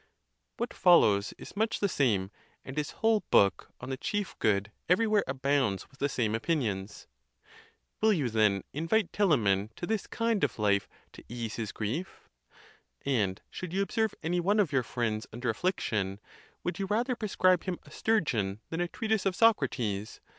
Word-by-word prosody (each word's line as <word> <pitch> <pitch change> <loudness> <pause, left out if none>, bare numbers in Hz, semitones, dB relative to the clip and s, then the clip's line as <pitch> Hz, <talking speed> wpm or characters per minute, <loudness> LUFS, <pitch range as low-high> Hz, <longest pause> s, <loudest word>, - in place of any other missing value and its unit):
What 235 - -3
fol 175 -2 +6
lows 100 0 +2
is - - -11
much 220 +2 0
the 200 - +2
same, 105 - +1 0.3
and 130 - -7
his 150 -1 -1
whole 225 -1 +2
book 100 -2 +3
on 125 +2 -6
the 130 - -2
chief 205 - -2
good 100 0 +1 0.2
everywhere 210 +2 +3
abounds 130 -6 0
with 135 - -22
the 140 - +1
same 115 -6 0
opinions. 115 - -2 1.0
Will 220 0 +5
you, 155 -10 +1
then, 110 -4 +2
invite 165 +6 +1
Telamon 110 - +2
to - - -5
this 220 +1 -2
kind 230 -3 0
of - - 0
life 100 -2 +1 0.2
to - - -12
ease 115 -1 -5
his 110 -3 -3
grief? 130 - -4 0.8
And 105 -8 0
should 180 -2 -6
you 195 +1 +2
observe 220 +1 -1
any 175 +2 0
one 200 +5 +2
of 190 -9 +2
your 135 -2 +3
friends 115 -2 -2
under 120 +1 -1
affliction, 105 - -1 0.4
would 175 - -3
you 195 - -1
rather 240 +5 0
prescribe 185 -5 +2
him 185 -2 -2
a - - -17
stur 220 -1 +2
geon 105 - -1
than 165 +1 -1
a 175 - 0
treatise 220 +1 -1
of 185 - 0
Socrates? 125 - +1
140 Hz, 175 wpm, -30 LUFS, -, 1.0 s, fol